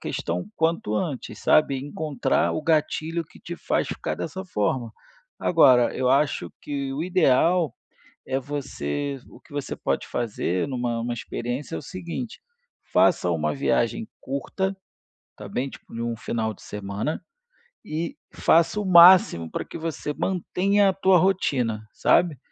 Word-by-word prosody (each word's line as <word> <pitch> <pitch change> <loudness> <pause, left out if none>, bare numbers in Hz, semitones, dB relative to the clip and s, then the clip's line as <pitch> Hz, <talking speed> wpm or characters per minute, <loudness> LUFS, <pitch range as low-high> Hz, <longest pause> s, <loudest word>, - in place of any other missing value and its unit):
questão 85 +2 -3
o 90 - -9
quanto 160 -9 0
antes, 145 0 -4
sabe. 145 -3 +4
Encontrar 145 +1 -1
o 155 - -3
gatilho 160 +1 0
que - - -17
te - - -7
faz - - 0
ficar - - -3
dessa 190 +3 -5
forma. 120 - -1 0.5
Agora 130 -8 +5
eu 130 -1 0
acho 140 +2 +2
que 140 -2 -3
o 145 - -2
ideal 170 -3 +3 0.5
é 135 0 0
você 140 - -4
o - - -15
que 155 - -19
você 145 -2 -4
pode 70 - -2
fazer 105 -4 -1
numa 120 -3 -2
uma 120 +1 -2
experiência 120 +5 -4
é - - -2
o - - -6
seguinte, 185 +6 -6 0.5
faça 115 - +3
uma 75 -2 0
viagem 70 - 0
curta, 190 +8 -3 0.6
tá - - -9
bem, 135 +3 -2
tipo, - - -14
num 115 0 -3
final 110 -1 -2
de - - -19
semana 105 +8 -4 0.6
e 165 -2 -4 0.2
faça 170 +5 +3
o - - -3
máximo 170 - +7
pra - - -3
que - - -10
você 160 -2 -3
mantenha 195 +3 +1
a 190 - +3
tua 190 -1 +4
rotina, 125 - +1
sabe: 170 -6 +3
145 Hz, 150 wpm, -25 LUFS, 120-170 Hz, 0.6 s, máximo